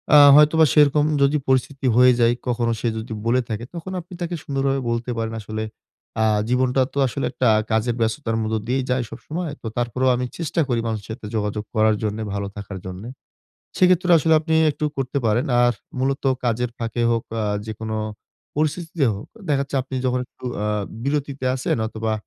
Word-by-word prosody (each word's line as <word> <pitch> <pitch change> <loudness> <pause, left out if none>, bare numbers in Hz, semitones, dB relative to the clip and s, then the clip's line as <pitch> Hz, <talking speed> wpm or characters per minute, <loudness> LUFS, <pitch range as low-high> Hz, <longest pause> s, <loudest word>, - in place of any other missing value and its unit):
আ - - +10 0.2
হয়তোবা 155 +2 +6
সেরকম 150 0 +5 0.2
যদি 140 +2 +4
পরিস্থিতি 135 +1 0
হয়ে 125 0 +7
যায় 120 0 +4
কখনো 120 -1 +1
সে 120 - -1
যদি 110 0 -5
বলে 125 +2 +3
থাকে 110 +1 -3
তখন 170 +3 -6
আপনি 175 +2 -14
তাকে 175 0 -2
সুন্দরভাবে 135 -1 0
বলতে 115 +1 -2
পারেন 115 0 -2
আসলে 110 +1 -4 0.6
আ - - +4 0.3
জীবনটা 130 +1 +2
তো - - -7
আসলে 140 +3 -3
একটা 125 -1 0 0.2
কাজের 110 +2 +1
ব্যস্ততার 115 0 -1
মধ্যে 110 0 -1
দিয়েই 130 +1 0
যায় 125 -1 +1
সবসময়। 155 +8 -5
তো 115 - -5
তারপরেও 125 +2 +1
আমি 125 +1 -1
চেষ্টা 165 0 -1
করি 120 -2 0
মানুষের 110 -3 -4
সাথে 115 -1 -8
যোগাযোগ 105 0 -1
করার 110 0 +4
জন্যে, 105 +1 -2
ভালো 100 0 -2
থাকার 100 -1 -7
জন্যে। 95 +6 -7 0.7
সেক্ষেত্রে 180 0 +4
আসলে 160 +2 +3
আপনি 160 0 -1 0.2
একটু 150 - -4
করতে 135 +1 -1
পারেন। 115 +3 +2 0.2
আর 120 0 +4 0.3
মূলত 135 +1 -1 0.2
কাজের 120 0 0
ফাঁকে 115 0 -2
হোক, 115 -1 +1 0.2
আ - - 0 0.2
যেকোনো 110 0 -4 0.6
পরিস্থিতিতে 155 0 0
হোক 100 - -8 0.2
দেখা 140 -2 +2
যাচ্ছে 140 - -4
আপনি 130 +1 -8
যখন 125 0 +1
একটু - - -18 0.2
আ - - 0 0.4
বিরতিতে 140 -2 -2
আছেন 130 - -1
অথবা 110 0 -3
125 Hz, 180 wpm, -22 LUFS, 110-140 Hz, 0.7 s, আ